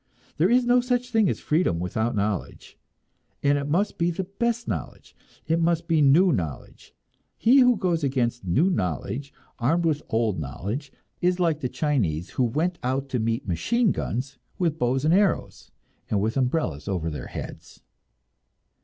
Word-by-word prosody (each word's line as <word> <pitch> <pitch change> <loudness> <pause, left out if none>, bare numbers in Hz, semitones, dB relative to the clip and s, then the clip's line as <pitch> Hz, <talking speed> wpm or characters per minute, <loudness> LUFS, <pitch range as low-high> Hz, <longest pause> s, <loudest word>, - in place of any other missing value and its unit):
There 170 +5 +3
is 245 +1 +4
no 245 +1 +4
such 250 0 -1
thing 220 -4 +3
as - - -2
freedom 150 - +1
without 110 +7 -1
knowledge, 100 -2 -3 0.7
and 145 0 +4
it 140 0 -2
must 195 +7 0
be 170 +1 +2
the 175 +3 -2
best 235 +5 -2
knowledge, - - -6 0.3
it 165 +1 +1
must 170 0 +1
be 165 -3 +3
new 160 +7 +5
knowledge; 80 - -5 0.4
he 255 +5 +5
who 250 -3 +5
goes 170 -5 0
against 125 -4 0
new 140 - +2
knowledge 120 - -3 0.3
armed 165 +8 +1
with 155 -2 +1
old 110 -5 0
knowledge 100 - -5 0.3
is 180 +1 +1
like 165 -4 +1
the 125 - -2
Chinese 100 - -1
who 130 - 0
went 160 +9 0
out 135 +2 -2
to 125 - -1
meet 115 0 -1
machine 225 - +1
guns 135 +3 -4 0.2
with 165 -3 0
bows 130 +2 +1
and 160 - +4
arrows, 200 +1 +1 0.4
and 105 - +1
with 110 +3 -1
umbrellas 125 - -1
over 85 -5 -2
their 75 - -6
heads. - - -9
145 Hz, 165 wpm, -25 LUFS, 115-180 Hz, 0.7 s, new